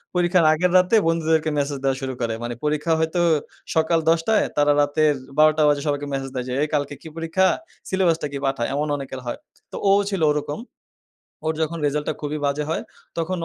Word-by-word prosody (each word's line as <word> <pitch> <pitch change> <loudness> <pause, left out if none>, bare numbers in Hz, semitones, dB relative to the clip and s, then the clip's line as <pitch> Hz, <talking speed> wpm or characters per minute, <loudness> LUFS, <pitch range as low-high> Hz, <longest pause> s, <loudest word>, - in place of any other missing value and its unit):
পরীক্ষার 175 -1 +3
আগের 175 +3 +1
রাতে 185 +5 +4
বন্ধুদেরকে 160 -1 +1
মেসেজ 140 0 -1
দেওয়া 135 -1 +1
শুরু 130 -1 -3
করে। 115 -1 0
মানে 120 0 -3
পরীক্ষা 150 +2 +1
হয়তো 160 +2 0 0.5
সকাল 160 +1 +3
১০ঃ০০, 170 +6 +3
তারা 145 0 +4
রাতের 150 +1 +2 0.2
১২ঃ০০ 155 0 +5
বাজে 145 -1 +2
সবাইকে 145 0 -1
মেসেজ 135 0 -3
দেয় 125 -1 -2
যে, - - -2
"এই - - 0
কালকে 145 -1 0
কি - - -10
পরীক্ষা? 165 +3 +2 0.4
সিলেবাসটা 170 -5 +1
কি? 140 - -4
পাঠা।" 135 -3 0
এমন 150 +2 -1
অনেকের 135 -1 -6
হয়। 120 - -4 0.3
তো - - -8
ও - - +6 0.2
ছিল 195 -4 -2
ওরকম। 150 +4 -3 0.9
ওর 160 - +2
যখন 165 +1 -2
রেজাল্ট 150 +1 -1
টা - - -2
খুবই 150 0 -3
বাজে 140 +1 -1
হয়, - - -1 0.4
তখন 175 +3 -1
155 Hz, 190 wpm, -22 LUFS, 145-165 Hz, 0.9 s, ও